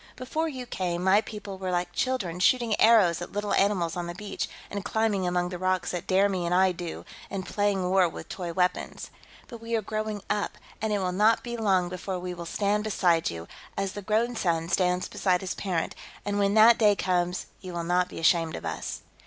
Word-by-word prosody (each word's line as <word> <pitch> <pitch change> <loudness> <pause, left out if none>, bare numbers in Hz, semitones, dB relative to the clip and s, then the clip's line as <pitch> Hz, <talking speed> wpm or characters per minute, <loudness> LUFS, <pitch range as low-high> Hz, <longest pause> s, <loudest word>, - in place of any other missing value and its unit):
Before 310 +6 -2
you 260 -4 -6
came, 180 -6 -2
my 190 +3 +5
people 205 -3 -8
were 190 -1 -3
like 175 0 -1
children, 190 -8 -1
shooting 235 +2 +3
arrows 210 -7 +5
at 175 - -6
little 205 0 -1
animals 190 -5 +2
on 175 -1 -3
the 175 - -6
beach, 205 +1 -4 0.2
and 200 -1 -4
climbing 205 -2 0
among 180 0 0
the 180 -1 -6
rocks 185 -1 0
at 175 - -4
dare 195 +1 +4
me 190 -3 -2
and 170 +1 +1
I 190 0 +5
do, 175 -1 -6 0.2
and 190 -2 -4
playing 205 -3 0
war 185 -1 +4
with - - -9
toy 175 -3 -5
weapons. 180 +1 -1 0.4
But 230 -1 -10
we 230 0 -2
are 225 - +1
growing 215 -1 -3
up, 210 -1 -1 0.2
and 220 0 -1
it 210 - +2
will 185 -2 -1
not 210 +5 +3
be 240 -1 -4
long 195 -6 +2
before 185 +1 -4
we 180 0 -5
will 170 -1 -7
stand 205 +3 0
beside 175 -6 +2
you, 85 0 -7 0.3
as 195 -1 -1
the 205 - -6
grown 220 +4 0
son 165 -5 0
stands 180 0 +1
beside 180 -2 +1
his 190 - -3
parent, 180 -5 -2 0.3
and 205 0 -1
when 200 +1 +2
that 225 +2 +7
day 210 -2 +5
comes, 180 -1 0
you 185 -2 -8
will 170 -1 -3
not 180 +1 +1
be - - -9
ashamed 165 0 +3
of - - -7
us." 80 -1 -4
190 Hz, 220 wpm, -27 LUFS, 180-210 Hz, 0.4 s, that